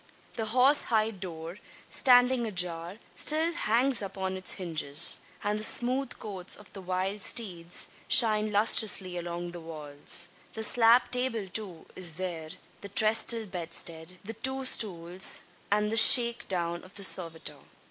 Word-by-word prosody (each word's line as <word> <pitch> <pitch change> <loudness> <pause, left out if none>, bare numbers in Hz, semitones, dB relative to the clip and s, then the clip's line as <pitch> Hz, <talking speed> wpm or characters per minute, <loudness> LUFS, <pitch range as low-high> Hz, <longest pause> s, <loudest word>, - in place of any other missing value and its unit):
The 225 -2 -4
horse 255 +6 +4
hide 220 -3 -1
door, 170 0 -8 0.3
standing 250 -2 +3
ajar, 175 -2 0 0.2
still 320 +3 +1
hangs 250 -2 +1
upon 190 -1 -5
its 185 -1 -2
hinges; 160 -4 +1 0.2
and 210 +1 -2
the - - -3
smooth 250 +3 +1
coats 190 -4 -4
of 210 - -14
the 195 - -9
wild 185 +2 -4
steeds 175 -7 -2 0.2
shine 215 -2 +3
lustrously 205 -3 +3
along 175 0 -6
the 175 - -9
walls. 155 +1 -1 0.3
The 220 - -4
slab 240 +2 +4
table, 250 -5 0
too, 185 -4 -2
is 175 -4 +4
there, 170 -3 -5 0.3
the 200 - -9
trestle 220 +2 +3
bedstead, 170 -1 -6
the 220 +3 -6
two 265 +4 -2
stools, 180 -6 0 0.3
and 210 +1 0
the 225 - 0
"shake 235 +1 +4
down" 170 -2 -3
of 185 - -15
the 200 - -5
servitor. 165 -4 -1
200 Hz, 145 wpm, -28 LUFS, 175-225 Hz, 0.3 s, horse